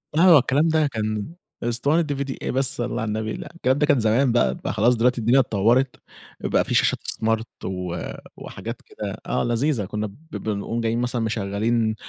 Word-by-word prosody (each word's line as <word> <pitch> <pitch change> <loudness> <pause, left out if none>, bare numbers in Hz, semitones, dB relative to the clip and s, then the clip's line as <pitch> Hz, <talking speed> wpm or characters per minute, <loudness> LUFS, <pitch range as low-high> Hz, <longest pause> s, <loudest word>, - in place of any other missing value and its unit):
آه، 170 -1 +7
الكلام 140 +5 +2
ده 155 -2 +3
كان 110 +2 -3 0.3
إسطوانة 125 +8 +2
DVD 140 -2 -3
إيه - - -2
بس 135 +1 +2
صلي 120 -2 -2
على 110 - -2
النبي، 110 +1 -2
لأ. - - -7
الكلام 130 -5 +1
ده 150 - +3
كان 145 -4 +3
زمان 115 +4 +3
بقى 65 - +2
بقى - - -4
خلاص 115 +4 +3
دلوقتي 120 +1 +2
الدنيا 120 +5 +4
اتطورت، 120 +2 +2 0.4
بقى - - +1
في - - -3
شاشات - - +3
smart 110 0 0 0.2
و 90 -2 -3 0.4
وحاجات - - -7
كده، - - -6
آه - - 0
لذيذة 120 -1 0
كنا 105 +2 -3
ب 100 - -13 0.2
بنقوم 110 +2 -3
جايين 115 +1 0
مثلًا 125 -1 -1
مشغلين 110 +1 0
120 Hz, 185 wpm, -23 LUFS, 110-135 Hz, 0.4 s, آه